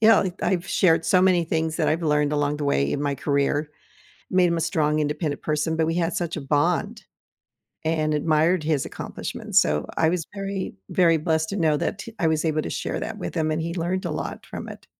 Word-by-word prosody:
you 220 - +6
know, 200 -4 +5
I've 185 -1 0
shared 165 -3 +3
so 185 -1 +4
many 180 -2 +4
things 160 -1 -1
that 160 - +1
I've 165 +2 0
learned 150 -1 +2
along 145 0 0
the 150 - -2
way 70 - +1
in 145 - -2
my 140 -1 0
career, 140 +1 +1 0.7
it - - -3
made 180 -1 +5
him 170 -1 0
a - - -1
strong, 155 -2 +1
independent 150 0 -2
person, 155 +1 0
but 160 0 +2
we 165 - 0
had 170 -1 0
such 175 -1 -2
a - - -4
bond 145 +2 0 0.8
and 155 -1 +1
admired 155 +3 +2
his 150 -3 0
accomplishments, - - -1
so, 75 0 0
I 160 - +3
was 170 -1 0
very 195 -1 -4 0.2
very 170 -3 +4
blessed 160 0 0
to 200 - -3
know 155 -4 +2
that 200 - -3 0.2
I 165 - +3
was 160 0 0
able 155 -1 +1
to - - -5
share - - -3
that 220 -1 -5
with 180 - -5
him, 155 -2 0
and 155 +1 -1
he 170 +1 -3
learned 180 +2 -2
a - - -2
lot - - -5
from - - -7
it. - - -10
160 Hz, 230 wpm, -24 LUFS, 150-175 Hz, 0.8 s, you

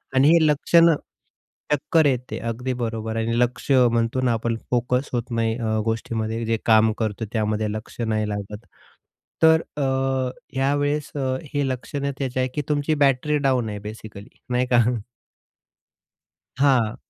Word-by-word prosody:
आणि 130 +2 +5
हे 165 -2 +5
लक्षणं 165 +2 +4 0.8
चक्कर 160 +2 +2
येते, 125 -3 -1
अगदी 125 +3 -3
बरोबर. 110 -1 -3
आणि 115 +1 0
लक्ष 125 +3 -1
म्हणतो 120 -1 +3
ना 125 -2 +2
आपण, 115 +1 -1 0.2
फोकस 125 +2 0
होत 120 0 -2
नाही 115 0 +1
अ, 110 -2 -1
गोष्टीमध्ये 115 0 -2
जे 115 0 0
काम 110 -1 +5
करतो 110 0 -2
त्यामध्ये 110 -1 0
लक्ष 110 +3 -8
नाही 110 -2 -1
लागत. 105 +2 -6 0.8
तर 160 0 +6 0.2
अ, 145 - 0 0.7
ह्यावेळेस 145 +2 0
अ, 130 -2 -1 0.2
हे 145 -1 0
लक्षणं 140 +2 -3
त्याची 130 -2 -2
आहे 130 - +1
की 150 - 0
तुमची 150 +1 +1
बॅटरी 140 +3 +1
डाउन 125 -4 +1
आहे 105 -1 -5
बेसिकली 105 -1 -9 0.2
नाही 125 +1 +1
का? 120 - +6 1.8
हां. 130 -6 +3
120 Hz, 145 wpm, -23 LUFS, 110-140 Hz, 1.8 s, तर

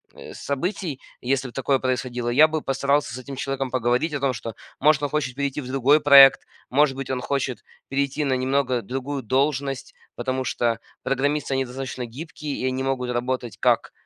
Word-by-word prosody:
э, - - -10
событий, 160 0 -3 0.2
если 135 +1 0
бы 120 - -11
такое 135 0 +1
происходило, 125 -2 -2
я 145 +6 +6
бы 155 0 -2
постарался 140 0 0
с - - -6
этим 135 +2 -8
человеком 135 -1 -3
поговорить 125 +5 +1
о 140 - -1
том, 135 -1 +1
что 115 0 -6 0.3
может 150 -2 +4
он 145 - -1
хочет 140 -4 -1
перейти 140 +1 -2
в 130 - -6
другой 135 +3 +4
проект, 140 -2 +8 0.3
может 140 +1 +3
быть 135 -1 -6
он 130 -1 -1
хочет 130 -1 -2 0.3
перейти 140 +2 -1
на 135 -2 +1
немного 130 -2 0
другую 135 +4 -4
должность. 135 +2 -1 0.2
Потому 130 +2 -2
что 115 -2 0 0.2
программисты 140 +1 0
они 135 0 0
достаточно 130 0 -5
гибкие 145 +4 -7
и 130 - -2
они 130 +1 -1
могут 130 -2 -1
работать 125 -2 -2
как - - +2
135 Hz, 185 wpm, -24 LUFS, 125-140 Hz, 0.3 s, проект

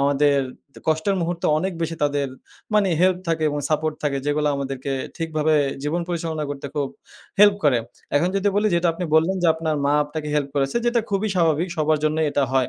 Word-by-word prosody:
আমাদের 140 0 +3 0.4
তে - - -12
কষ্টের 160 +6 +1
মুহূর্তে 170 0 -1
অনেক 190 +4 -2
বেশি 165 0 -2
তাদের 145 -1 0 0.5
মানে 205 -2 +4
হেল্প 185 0 +4
থাকে 160 -1 0
এবং 145 - -2
সাপোর্ট 155 0 0
থাকে 140 -2 0
যেগুলা 150 0 +1
আমাদেরকে 135 0 -4 0.2
ঠিকভাবে 155 -2 0 0.3
জীবন 155 +4 -1
পরিচালনা 165 -3 -2
করতে 140 0 -5
খুব 140 -2 -1 0.5
হেল্প 205 -1 +8
করে। 130 -5 +4 0.4
এখন 170 +5 +3
যদি 195 +1 +2
বলি 210 - +3
যেটা 170 0 +2
আপনি 175 +2 -4
বললেন, 165 +5 +3
যে - - +4
আপনার 160 -1 -1
মা 140 - +2
আপনাকে 150 0 -5
হেল্প 145 -2 0
করেছে, 140 +6 0
যেটা 240 0 +3
খুবই 200 +2 0
স্বাভাবিক 165 0 +2
সবার 155 0 +2
জন্যই 155 0 +1
এটা 145 - +1
হয়। 130 -1 +2
155 Hz, 195 wpm, -23 LUFS, 145-175 Hz, 0.5 s, হেল্প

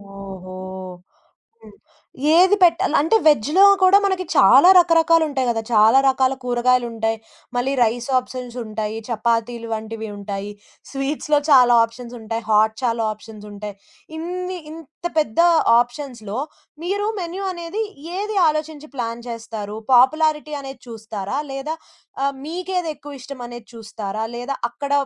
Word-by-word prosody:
ఓహో! 190 -2 -9 1.1
హ్మ్. - - -15 0.6
ఏది 375 +3 +6
పెట్టాలి 335 -3 +3
అంటే 320 +9 +2
వెజ్‌లో 300 - +4 0.2
కూడా 375 +1 +7
మనకి 380 -2 -1
చాలా 260 - +7
రకరకాలుంటాయి 325 -5 +3
కదా, 225 -1 0
చాలా 220 +4 +6
రకాల 265 0 +2
కూరగాయలుంటాయి. 240 -2 0 0.4
మళ్ళీ 250 +3 0
రైస్ 240 +1 +1
ఆప్షన్స్ 250 -1 -8
ఉంటాయి. 215 0 -4
చపాతీలు 230 0 -1
వంటివి 220 0 -5
ఉంటాయి. 200 0 -5 0.4
స్వీట్స్‌లో 290 +2 0
చాలా 250 -4 +6
ఆప్షన్స్ 235 +1 -11
ఉంటాయి. 225 +1 -4
హాట్ 220 0 +3
చాలా 230 -2 0
ఆప్షన్స్ 215 -1 -13
ఉంటాయి. 205 0 -7 0.4
ఇన్ని 360 +3 -4
ఇంత 320 0 -13
పెద్ద 300 -4 0 0.4
ఆప్షన్స్‌లో 245 -3 -4 0.4
మీరు 405 +4 -1
మెన్యూ 365 +2 -5
అనేది 345 +5 -4 0.3
ఏది 415 +1 -3
ఆలోచించి 305 0 -3
ప్లాన్ 235 -1 -4
జేస్తారు? 220 -3 -6 0.2
పాపులారిటీ 300 +4 +3
అనేది 270 -2 -9
చూస్తారా 220 0 -5
లేదా 275 +4 -4 0.5
ఆహ్, 275 0 0
మీకేది 360 +1 -3
ఎక్కువ 285 -2 -11
ఇష్టం 275 +1 -9
అనేది 240 -1 -10
చూస్తారా? 215 -1 -5
లేదా 245 +3 -4 0.2
అక్కడ 280 +4 -6
250 Hz, 125 wpm, -21 LUFS, 225-310 Hz, 1.1 s, కూడా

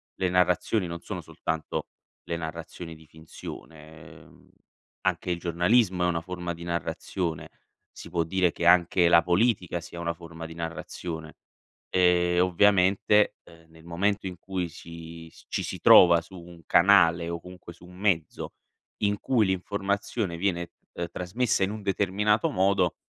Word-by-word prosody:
le 95 -1 0
narrazioni 90 +2 +1
non 85 0 -6
sono - - -6
soltanto 80 -1 -4 0.4
le 85 - -3
narrazioni 80 +1 -7
di 80 0 -17
finzione; 80 0 -11 0.2
ehm, - - -20 0.6
anche 90 - 0
il 85 - -2
giornalismo 90 +2 +2
è - - +3
una 85 -1 0
forma 90 0 -5
di 85 +1 -10
narrazione; 85 0 -3 0.5
si - - -11
può 85 -2 0
dire 90 0 +1
che 85 - -4
anche 85 0 +5
la 85 0 +6
politica 90 -2 +1
sia 85 +1 -9
una 85 0 -1
forma 85 -1 -10
di 80 0 -9
narrazione. 80 -1 -6 0.6
Ehm, 90 -1 +3
ovviamente, 100 +2 +3
ehm, 85 -1 -19
nel 80 0 -17
momento 95 +3 -1
in 90 -2 -7
cui 90 -1 -3
si 85 0 -11
s - - -19
ci - - -2
si - - -5
trova 85 -2 +8
su 90 +3 -13
un 85 -1 -14
canale 85 -3 +4
o 85 0 -4
comunque 90 -1 -11
su 90 - -17
un 90 0 -14
mezzo, 95 -6 -1 0.5
in 105 0 +2
cui 120 -6 +2
l'informazione 100 0 -2
viene, 90 -1 0 0.3
ehm, 85 0 -4
trasmessa 100 +4 0
in 95 - 0
un 110 0 -6
determinato 100 +2 +1
modo, 95 -2 +2
90 Hz, 155 wpm, -27 LUFS, 85-95 Hz, 0.6 s, trova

